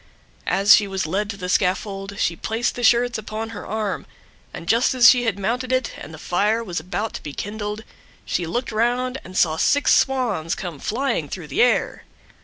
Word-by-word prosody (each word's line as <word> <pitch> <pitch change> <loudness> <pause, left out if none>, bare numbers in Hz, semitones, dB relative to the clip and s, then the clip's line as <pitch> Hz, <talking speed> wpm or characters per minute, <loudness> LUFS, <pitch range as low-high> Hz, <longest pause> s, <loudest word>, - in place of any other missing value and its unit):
As 200 +2 +6
she 205 - +1
was 190 -3 -2
led 200 +6 -1
to 200 - -5
the 180 -2 -5
scaffold 195 +1 -1
she 170 - 0
placed 225 +7 -2
the 245 - -6
shirts 240 0 +3
upon 215 +1 -5
her 225 - -8
arm, 215 -1 -3 0.4
and - - -8
just 235 +5 +3
as 245 -1 +7
she 245 -1 +1
had 210 -4 0
mounted 245 +6 -2
it, 255 -1 0
and - - -10
the 160 - -9
fire 210 +8 0
was 180 -6 -3
about 205 +4 -4
to - - -6
be 145 - -7
kindled, 210 +3 -5 0.4
she 175 - -2
looked 240 +9 -2
round, 245 +4 0
and 185 +1 -8
saw 160 -2 +3
six 285 - +3
Swans 235 - +1
come 175 -6 -6
flying 230 - -1
through 170 -5 -7
the 135 - +1
air. 245 - +1
210 Hz, 200 wpm, -22 LUFS, 185-240 Hz, 0.4 s, as